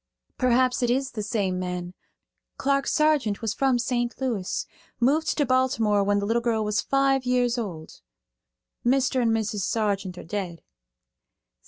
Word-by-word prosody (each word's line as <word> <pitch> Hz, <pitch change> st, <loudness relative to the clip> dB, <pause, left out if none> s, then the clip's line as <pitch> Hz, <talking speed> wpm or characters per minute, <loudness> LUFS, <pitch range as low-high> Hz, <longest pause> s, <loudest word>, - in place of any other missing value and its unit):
"Perhaps 255 Hz, +1 st, +2 dB
it 245 Hz, -, +1 dB
is 265 Hz, +2 st, 0 dB
the 215 Hz, -, -4 dB
same 200 Hz, -3 st, -1 dB
man. 180 Hz, -1 st, -4 dB, 0.6 s
Clark 275 Hz, 0 st, +1 dB
Sargeant 300 Hz, -9 st, +2 dB
was 225 Hz, -1 st, 0 dB
from 265 Hz, -1 st, +2 dB
St. 240 Hz, 0 st, -1 dB
Louis; 230 Hz, -9 st, -2 dB, 0.3 s
moved 295 Hz, +6 st, +2 dB
to 295 Hz, -, +2 dB
Baltimore 235 Hz, -5 st, +2 dB
when 205 Hz, +1 st, +2 dB
the 200 Hz, -, -1 dB
little 230 Hz, +3 st, +1 dB
girl 225 Hz, -2 st, 0 dB
was 210 Hz, 0 st, +1 dB
five 275 Hz, -1 st, +2 dB
years 250 Hz, -1 st, +1 dB
old. 175 Hz, -10 st, -6 dB, 0.8 s
Mr. 260 Hz, +1 st, +2 dB
and 235 Hz, -, +2 dB
Mrs. 220 Hz, -2 st, 0 dB
Sargeant 195 Hz, -2 st, -1 dB
are -, -, -8 dB
dead." 175 Hz, -2 st, -5 dB
235 Hz, 150 wpm, -25 LUFS, 205-260 Hz, 0.8 s, Perhaps